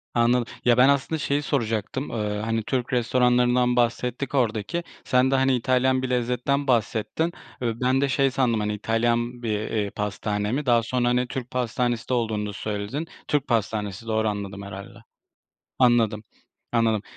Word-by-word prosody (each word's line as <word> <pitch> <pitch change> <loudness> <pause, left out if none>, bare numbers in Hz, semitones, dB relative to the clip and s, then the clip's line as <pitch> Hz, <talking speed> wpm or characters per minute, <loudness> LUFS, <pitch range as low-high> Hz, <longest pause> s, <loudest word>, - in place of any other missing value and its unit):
Anladım. 120 0 +3 0.2
Ya, 120 -1 +5
ben, 130 +2 +6
aslında 140 +3 +1
şeyi 145 +1 0
soracaktım, 120 -1 -2
eee, 105 -2 -2
hani, 115 -1 -1
Türk 125 +2 -2
restoranlarından 125 0 +3
bahsettik 125 +3 0
oradaki. 120 +7 0 0.2
Sen 130 +1 +2
de, - - +3
hani, 135 0 +3
İtalyan 130 +1 +2
bir 130 - -3
lezzetten 125 +3 0
bahsettin 120 +7 0 0.3
ve 115 0 -2
ben 130 +1 +2
de 140 - +1
şey 135 0 +2
sandım, 125 -4 +1
hani, 105 0 -1
İtalyan 120 +3 0
bir, 105 -2 0
eee, 105 -2 0
pastane 105 0 -2
mi, 140 +4 -1
daha 120 -2 +4
sonra, 120 +1 0
hani, 125 0 +2
Türk 125 -1 -5
pastanesi 120 -1 -1
de - - +1
olduğunu 110 -3 0
da - - -6
söyledin. 105 +10 -4 0.2
Türk 145 -2 0
pastanesi 110 -2 -2
doğru 110 0 +1
anladım 100 -1 -4
herhâlde. 100 +3 -9 0.8
Anladım, 115 -4 +3 0.5
anladım. 115 -3 +2
120 Hz, 160 wpm, -24 LUFS, 110-130 Hz, 0.8 s, ben